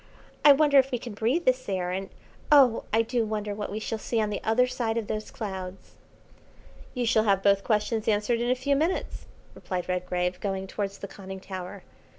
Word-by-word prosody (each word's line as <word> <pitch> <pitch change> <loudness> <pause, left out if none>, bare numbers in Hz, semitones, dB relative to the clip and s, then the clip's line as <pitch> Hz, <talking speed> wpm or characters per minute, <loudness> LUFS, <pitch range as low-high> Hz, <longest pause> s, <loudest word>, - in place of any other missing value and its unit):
I 295 - +9
wonder 285 0 +6
if 265 0 +2
we 250 - -1
can 235 -1 -8
breathe 240 +12 0
this 255 -3 +1
air, 180 -2 -1
and 190 +1 -4 0.4
oh 265 -6 +6
I 225 +1 +3
do 235 +1 0
wonder 210 -1 -3
what 205 -1 -5
we 210 - -3
shall 220 0 -4
see 230 +1 -1
on 210 -1 0
the 205 - -4
other 225 +3 +3
side 240 -3 -2
of 225 - -1
those 215 +1 -4
clouds." 190 -3 -7 1.0
"You 245 -1 0
shall 225 -2 +3
have 195 -2 +2
both 200 -1 +4
questions 215 0 0
answered 220 +2 +1
in 240 - 0
a 255 - +3
few 280 +2 0
minutes," 320 +6 -2 0.3
replied 180 -2 -4
Redgrave, 180 0 -1
going 195 -1 -3
towards 195 0 -4
the 200 - -7
conning 190 -1 -9
tower. 185 0 -7
215 Hz, 200 wpm, -27 LUFS, 195-245 Hz, 1.0 s, I